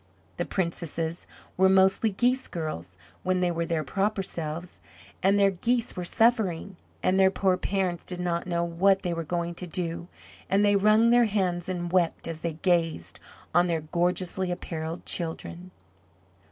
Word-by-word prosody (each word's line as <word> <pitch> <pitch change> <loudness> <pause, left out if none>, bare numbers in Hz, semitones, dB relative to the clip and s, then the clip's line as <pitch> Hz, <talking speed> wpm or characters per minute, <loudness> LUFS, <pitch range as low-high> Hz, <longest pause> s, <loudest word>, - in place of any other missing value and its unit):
The - - -1
princesses 170 -2 -3 0.3
were 190 +1 +5
mostly 190 +3 +4
geese 250 +6 +1
girls 90 - -5 0.2
when 185 0 0
they 180 -1 +1
were 170 0 -2
their 165 -2 0
proper 195 +6 -1
selves, 165 0 -5 0.4
and 195 +2 +4
their 200 -1 +4
geese 235 +6 0
were 180 - -3
suffering, 200 -3 +1 0.3
and 190 +1 +3
their 190 0 +6
poor 190 -1 +2
parents 185 -2 -1
did 180 -1 -5
not 175 0 -1
know 170 -1 0
what 190 +3 +2
they 175 -2 -1
were 165 0 -3
going 170 +1 -2
to 180 +1 -5
do 170 0 -3 0.4
and 200 +2 +3
they 205 0 +4
wrung 215 +3 +5
their 240 0 +6
hands 185 -4 -1
and 175 -2 -3
wept 175 -3 +1
as 165 -1 -5
they 170 -1 -2
gazed 165 - 0 0.3
on 175 +2 +4
their 165 -2 0
gorgeously 180 +3 -1
apparelled 165 -1 -5
children. 170 +1 -4
180 Hz, 165 wpm, -27 LUFS, 170-195 Hz, 0.4 s, their